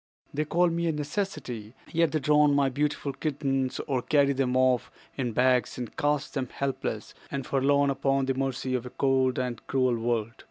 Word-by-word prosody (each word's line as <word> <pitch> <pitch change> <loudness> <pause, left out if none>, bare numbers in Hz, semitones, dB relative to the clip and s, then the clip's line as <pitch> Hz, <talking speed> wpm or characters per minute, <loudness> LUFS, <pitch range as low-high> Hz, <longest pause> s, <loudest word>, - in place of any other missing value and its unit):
"They 155 +2 0
call 175 +3 +3
me 170 0 -1
a - - +2
necessity, 145 - -4 0.2
yet 165 0 +2
they 155 - +1
drown 150 0 +4
my 140 -1 +3
beautiful 145 +1 -1
kittens, 135 -4 -1
or 130 -3 0
carry 140 +2 +3
them 130 -1 0
off 130 -2 +2 0.3
in 125 -3 -2
bags 125 0 +2
and 120 -3 -6
cast 145 -1 0
them 130 -4 -2
helpless 140 -1 -3 0.2
and 135 -2 -4
forlorn 140 +1 +2
upon 135 0 +1
the 135 - +1
mercy 130 -1 -2
of 125 -1 -2
a - - -7
cold 130 -1 +1
and 125 -3 -2
cruel 130 -2 +2
world. 115 -1 -1
135 Hz, 185 wpm, -27 LUFS, 125-145 Hz, 0.3 s, drown